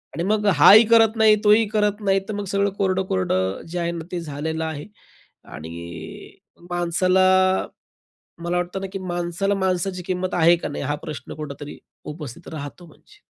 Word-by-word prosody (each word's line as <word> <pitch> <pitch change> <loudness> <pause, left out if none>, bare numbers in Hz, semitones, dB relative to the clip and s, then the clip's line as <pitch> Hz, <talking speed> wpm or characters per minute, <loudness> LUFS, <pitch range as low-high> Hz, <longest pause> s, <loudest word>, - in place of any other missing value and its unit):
आणि 170 - -2
मग 210 +2 0 0.2
हाही 220 +3 +9
करत 225 -1 +5
नाही, 220 -1 +6
तोही 210 +2 +5
करत 210 -1 0
नाही. 195 -1 +2
तर - - -2
मग 205 0 -4
सगळं 200 0 +2
कोरडं-कोरडं 95 - 0
जे 175 +1 -4
आहे 170 0 -1
ना, 170 -1 -6
ते 180 - -3
झालेलं 160 +1 -4
आहे. 155 -2 -5 0.6
आणि 85 +1 -10 0.3
माणसाला, 185 +2 +2 1.2
मला 175 +1 -1
वाटतं 180 +2 -3
ना, - - -3
की 195 - -4
माणसाला 175 +2 -2
माणसाची 185 -1 -1
किंमत 185 0 -2
आहे 170 0 +5
का - - -2
नाही? 145 - -5
हा 145 +2 -1
प्रश्न 150 - -7
कुठेतरी 145 -1 -8 0.4
उपस्थित 150 +1 -10
राहतो 150 +4 -8
म्हणजे. 155 - -21
175 Hz, 160 wpm, -22 LUFS, 155-195 Hz, 1.2 s, हाही